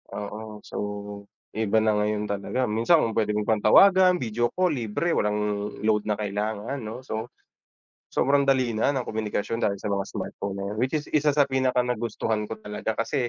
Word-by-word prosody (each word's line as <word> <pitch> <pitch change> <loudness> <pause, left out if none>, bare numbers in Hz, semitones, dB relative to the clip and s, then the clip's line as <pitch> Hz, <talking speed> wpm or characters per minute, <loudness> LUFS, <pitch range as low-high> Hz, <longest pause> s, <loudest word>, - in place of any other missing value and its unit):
oo 105 +1 -7
so - - -8 0.8
iba 110 0 +2
na 110 -1 +2
ngayon 105 0 -1
talaga 105 +5 -1
minsan 115 +10 +4
kung 115 -1 -1
pwede 105 -1 +1
ko 105 - 0
pang 110 +1 +1
tawagan 185 - +6
video 120 +1 -1
call 185 0 +2
libre 115 +8 -1
walang 105 0 -1
load 105 -1 +1
na 105 - +1
kailangan 105 +4 -3
'no. 110 +3 -6
So, 110 -4 -5 0.8
sobrang 140 0 +2
dali 130 -3 +3
na 110 - +1
ng 130 - -1
komunikasyon 110 +1 -2
dahil 100 -3 +1
sa 100 +1 -4
mga 100 -1 -1
smartphone 100 -1 -5
na 100 - -4
'yan - - -6
which 130 +4 0
is 150 - -3
isa 150 -1 +3
sa 145 - +6
pinakanagustuhan 125 -5 0
ko 110 - -4
talaga. 105 +1 -3
Kasi, 120 +2 -1
110 Hz, 180 wpm, -25 LUFS, 105-130 Hz, 0.8 s, tawagan